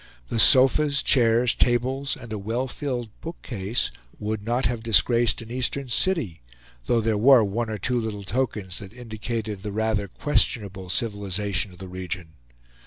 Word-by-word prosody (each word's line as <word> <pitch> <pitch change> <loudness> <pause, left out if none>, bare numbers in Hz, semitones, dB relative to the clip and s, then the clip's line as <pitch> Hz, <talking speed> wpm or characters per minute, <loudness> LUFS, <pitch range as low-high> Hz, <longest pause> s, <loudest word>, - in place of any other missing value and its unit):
The 115 - -1
sofas, 135 +4 +6
chairs, 120 -1 +3
tables, 130 +3 0
and 115 -2 -8
a 105 - -3
well 115 +6 -2
filled 125 -5 -4
bookcase 120 - -3 0.3
would 105 0 -3
not 120 +5 0
have 120 -1 -1
disgraced 115 +2 +3
an 115 - -12
Eastern 130 +1 -2
city; 120 - 0 0.4
though 115 - +2
there 110 -1 0
were 125 0 +7
one 110 +3 -2
or 110 - -3
two 120 +5 -1
little 105 -2 -5
tokens 105 -4 -2
that 100 +1 -10
indicated 110 -3 -5
the 105 - -5
rather 110 -1 0
questionable 100 -6 0
civilization 100 -2 -1
of 90 - -15
the 95 +1 -9
region. 90 -2 -6
115 Hz, 155 wpm, -24 LUFS, 100-125 Hz, 0.4 s, were